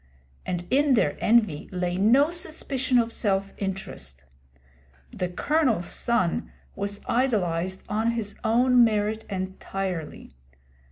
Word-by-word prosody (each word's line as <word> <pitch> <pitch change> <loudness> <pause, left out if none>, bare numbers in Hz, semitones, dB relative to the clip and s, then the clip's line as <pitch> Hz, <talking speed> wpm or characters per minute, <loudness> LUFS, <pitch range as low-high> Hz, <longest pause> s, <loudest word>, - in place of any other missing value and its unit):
And 175 -1 -2
in 280 0 +4
their - - +2
envy 215 -10 +2
lay 180 -1 -1
no 250 - +4
suspicion 270 -6 -1
of 230 -1 +1
self 195 -1 0
interest. 190 - -5 0.9
'The 180 - -2
Colonel's 245 - +1
son' 230 -8 0 0.2
was 200 +1 -4
idolised 190 -7 0
on 220 +3 0
his 220 -3 -4
own 245 +2 +5
merits 215 0 0
entirely. 190 - -4
210 Hz, 110 wpm, -26 LUFS, 185-240 Hz, 0.9 s, own